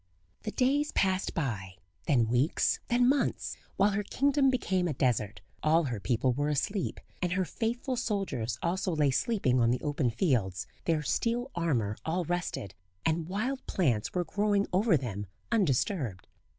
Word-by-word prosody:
The 215 - -4
days 285 +5 +2
passed 190 -1 +1
by, 100 - -3 0.3
then 120 -6 +3
weeks, 125 +7 +2
then 245 0 +3
months, 275 +2 +1 0.2
while 200 +2 +4
her 205 +1 0
kingdom 275 +6 +2
became 190 -8 +1
a 150 - -2
desert; 110 -7 0 0.2
all 160 +2 +4
her 125 -7 -3
people 120 +6 +1
were 145 +3 0
asleep, 175 +7 -1 0.2
and 180 -1 0
her 185 0 +1
faithful 240 +6 -2
soldiers 200 - -2
also 180 0 0
lay 145 -3 +3
sleeping 130 - +1
on 115 -1 +4
the 125 +1 +1
open 145 -4 0
fields, 110 - 0 0.2
their 160 -2 +1
steel 240 - 0
armour 125 -12 0
all 170 +2 -1
rusted, 175 - -3 0.3
and 160 +1 0
wild 250 +8 -2
plants 120 - +1
were 180 -1 +1
growing 205 +3 +1
over 195 -2 +4
them 105 -6 -4 0.2
undisturbed. 145 - +1
165 Hz, 155 wpm, -30 LUFS, 125-205 Hz, 0.3 s, while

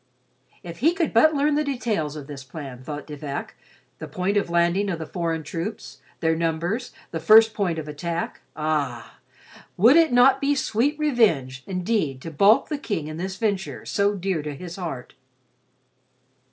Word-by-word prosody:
If 170 -1 -9
he 325 +8 +3
could 340 -4 -1
but 310 +7 +5
learn 290 +1 +2
the 300 +1 +2
details 230 - -2
of 150 -2 -7
this 140 -2 -8
plan, 135 -2 -9
thought 145 +2 -6
De 150 - -8
Vac: 140 -1 -5 0.5
the - - -6
point 185 +3 -2
of 200 -4 +1
landing 170 +4 +2
of 175 - -2
the 160 - -6
foreign 165 -1 -3
troops; 165 -2 -6 0.2
their 160 0 +2
numbers; 170 +8 -2 0.2
the 165 - -3
first 220 +7 +7
point 185 -7 -1
of 155 -1 -5
attack. 165 +3 -4
Ah, 145 -6 -2 0.6
would 235 - +6
it 330 -3 +5
not 245 +2 +5
be 285 +1 +2
sweet 270 +2 0
revenge 205 - +1
indeed 180 - -1
to 165 - -6
balk 200 +8 +4
the 300 -2 -3
King 160 - -3
in 155 - -6
this 190 +2 -4
venture 190 - -2
so 200 0 +1
dear 190 -4 -2
to 150 -1 -5
his 175 +3 -8
heart! 160 -9 -6
175 Hz, 175 wpm, -24 LUFS, 155-225 Hz, 0.6 s, first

